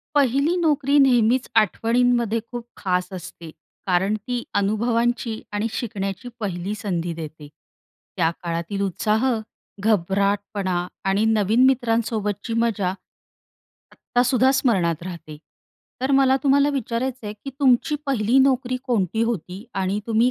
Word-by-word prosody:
पहिली 280 +4 +3
नोकरी 295 -4 +2
नेहमीच 245 -1 +3
आठवणींमध्ये 230 +2 +1
खूप 240 -1 -5
खास 180 -2 -1
असते. 170 -2 -9 0.4
कारण 190 +3 +2
ती 240 +3 -4
अनुभवांची 230 +2 0
आणि 205 +2 -1
शिकण्याची 200 -1 -4
पहिली 195 -1 -3
संधी 175 -5 -3
देते. 155 -2 -8 0.7
त्या 165 -3 +2
काळातील 170 +3 -3
उत्साह, 210 +5 0 0.6
घबराटपणा 200 -2 0 0.2
आणि 195 +3 +2
नवीन 220 +2 +3
मित्रांसोबतची 225 -4 0
मजा, 205 -5 0 1.0
आत्ता 245 - -1
सुद्धा 255 +1 +3
स्मरणात 175 - +1
राहते. 170 -4 -8 0.6
तर 260 - 0
मला 270 -1 +4
तुम्हाला 280 +1 +4
विचारायचंय, 250 -3 -3
की 215 +6 -9
तुमची 270 +2 +3
पहिली 250 -2 +2
नोकरी 260 -2 +2
कोणती 220 -2 0
होती 205 -3 -3
आणि 195 +1 -1
तुम्ही 230 +2 +3
220 Hz, 115 wpm, -23 LUFS, 195-245 Hz, 1.0 s, मला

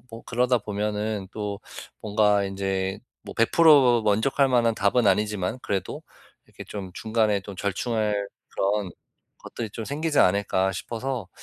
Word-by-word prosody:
뭐 115 +1 -9
그러다 125 +1 +1
보면은 105 -1 -3
또 105 -2 -4 0.4
뭔가 105 -1 +2
인제 95 0 -2 0.2
뭐 - - -9
100% 130 -1 +5
만족할 115 +7 +2
만한 120 -3 +3
답은 105 +4 +2
아니지만 105 +2 +1
그래도 95 -3 -3 0.4
이렇게 - - -12
좀 100 -3 -7
중간에 110 -2 +1
좀 95 0 -10
절충할 105 +1 -1 0.2
그런 100 -1 -1 0.5
것들이 115 -3 -7
좀 110 +1 -6
생기지 150 +3 -1
않을까 95 0 +3
싶어서 115 +1 -4
105 Hz, 280 characters per minute, -25 LUFS, 100-115 Hz, 0.5 s, 100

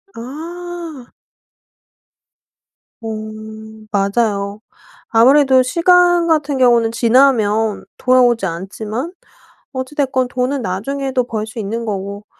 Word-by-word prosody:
아. 325 +2 -8 1.9
어 225 - -6 0.9
맞아요. 200 0 0 0.5
아무래도 260 +2 +5
시간 350 +4 +3
같은 300 -4 +1
경우는 235 -3 +4
지나면 225 -4 +2
돌아오지 245 -4 +3
않지만 210 - -5 0.6
어찌 260 +3 -5
됐건 260 -3 0
돈은 255 +1 -2
나중에도 255 +7 -2
벌 220 -2 -4
수 225 +1 -8
있는 225 +3 -3
거고 200 0 -5
250 Hz, 205 characters per minute, -17 LUFS, 220-280 Hz, 1.9 s, 아무래도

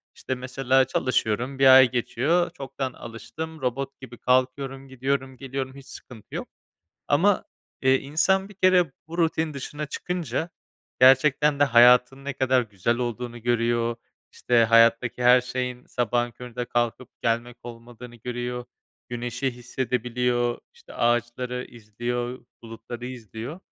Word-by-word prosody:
işte, 130 - -4
mesela 130 +1 +1
çalışıyorum, 130 0 -1
1 130 -1 +8
ay 130 -2 +7
geçiyor, 145 +8 +1
çoktan 135 -4 -5
alıştım. 160 +8 -8
Robot 135 +2 -3
gibi 125 -2 -10
kalkıyorum, 135 +1 0
gidiyorum, 130 0 -2
geliyorum, 135 0 -5
hiç 140 -1 -12
sıkıntı 115 -5 -12
yok. - - -4 0.6
Ama, 185 +7 +3 0.4
eee, 130 0 +4
insan 190 +8 +1
bir - - -12
kere 185 -5 +3 0.2
bu 170 +2 -8
rutinin 160 -2 +1
dışına 145 +2 -5
çıkınca 165 -1 -3 0.5
gerçekten 140 +3 +5
de - - +6
hayatın 125 +1 +5
ne 140 - -3
kadar 130 -1 +2
güzel 110 +1 -1
olduğunu 120 -1 -4
görüyor. 120 0 +1 0.4
İşte, 120 -1 +2
hayattaki 115 +1 +4
her 125 +1 +7
şeyin 125 0 -4
sabahın 120 0 -1
köründe 125 0 -6
kalkıp 120 +1 -1
gelmek 120 +1 -1
olmadığını 120 0 -11
görüyor. 120 +1 -5 0.4
Güneşi 120 +2 -3
hissedebiliyor, 125 0 -1
işte, 470 -1 -16
ağaçları 120 +1 -1
izliyor, 120 +2 -5 0.2
bulutları 115 +1 -8
izliyor 120 - -8
125 Hz, 125 wpm, -25 LUFS, 120-135 Hz, 0.6 s, 1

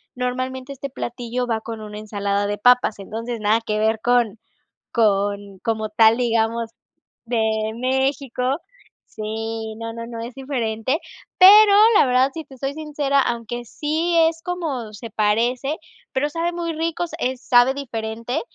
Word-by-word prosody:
normalmente 255 +2 -3
este 275 +1 -6
platillo 245 0 -4
va 225 -2 -1
con 225 0 -7
una 210 0 -8
ensalada 205 -1 -1
de 205 0 -2
papas, 245 -2 +4
entonces, 225 +4 -5
nada 215 +2 +2
que 215 -1 -2
ver 220 0 +1
con 240 -3 +2 0.6
con 200 -3 +1
como 220 -1 -2
tal, 225 +2 +5
digamos, 230 -1 0 0.6
de 220 -2 0
México 265 +1 -1 0.6
Sí, 220 0 -5
no, 230 0 -5
no, 230 0 -6
no, 230 -1 -7
es 235 +2 -7
diferente, 260 0 -2 0.4
pero, 405 +2 +9 0.2
la - - +6
verdad, 255 +1 +3
si 320 - -6
te 265 - -14
soy 270 +2 -3
sincera, 290 -3 0
aunque 240 0 -3
sí 315 +7 -1
es, 325 0 -3
como 315 - -3
se 230 +2 -8
parece, 240 +8 +1 0.4
pero 290 +3 0
sabe 335 +3 -1
muy 340 -1 -3
rico, 330 +2 -2
s 340 - -8
eh, 255 +1 -1
sabe 245 +1 +4
diferente, 230 0 -4
240 Hz, 150 wpm, -22 LUFS, 220-270 Hz, 0.6 s, pero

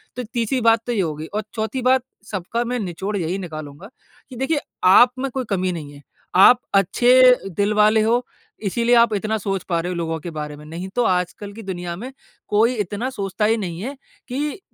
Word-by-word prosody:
तो 250 - -4
तीसरी 240 +2 0
बात 225 0 +4
तो - - 0
ये 210 - +1
होगी 155 -3 -3
और 215 - -1
चौथी 220 +4 -2
बात 255 0 +3 0.3
सबका 205 +5 -2
मैं 245 +1 -2
निचोड़ 195 +1 -4
यही 180 +1 -2
निकालूँगा 155 0 -8 0.4
कि 255 - -10
देखिए 270 +4 0 0.2
आप 220 +7 +7
में 275 +1 -1
कोई 260 -1 -3
कमी 185 -2 0
नहीं 150 -4 -7
है। 140 - -13 0.3
आप 240 +6 +8
अच्छे 250 +6 +6 0.2
दिल 205 +1 +2
वाले 215 +1 +4
हो 235 +3 +1 0.4
इसीलिए 235 +4 +2
आप 235 -1 +5
इतना 215 +2 -1
सोच 195 -3 -3
पा 170 -2 +1
रहे 175 +2 -4
हो 180 - -3
लोगों 165 -1 -2
के 175 - -7
बारे 150 -1 -5
में 150 - -13
नहीं 170 +5 -6
तो 245 - +2
आजकल 180 +2 -1
की 225 +2 -10
दुनिया 175 -3 -5
में 250 +8 -7 0.4
कोई 225 +4 +3
इतना 210 +7 -4
सोचता 200 -2 -2
ही 225 +1 +3
नहीं 175 -5 -4
है 270 +6 -5 0.3
कि 290 +6 -3
210 Hz, 210 wpm, -21 LUFS, 180-240 Hz, 0.4 s, आप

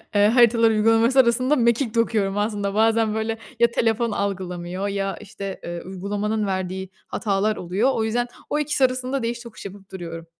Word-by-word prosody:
eee, 205 0 +5
haritalar 230 0 +5
uygulaması 225 +4 +3
arasında 255 +3 +4
mekik 235 -2 +1
dokuyorum 215 -4 +1
aslında. 205 -1 -1
Bazen 225 0 +2
böyle 220 +1 -2 0.2
ya 235 0 +4
telefon 230 0 +1
algılamıyor 185 -1 -3
ya, 195 -1 -2
işte, 195 -1 -7
eee, 170 0 -5
uygulamanın 205 +3 -2
verdiği 190 0 -3 0.2
hatalar 210 0 0
oluyor. 195 +9 0
O 225 - 0
yüzden 240 +2 0 0.2
o 295 - 0
ikisi 300 -2 +2
arasında 255 +1 -2
değiş 235 +1 -2
tokuş 235 -2 -11
yapıp 195 0 -10
duruyorum. 165 -3 -7
215 Hz, 160 wpm, -23 LUFS, 195-235 Hz, 0.2 s, eee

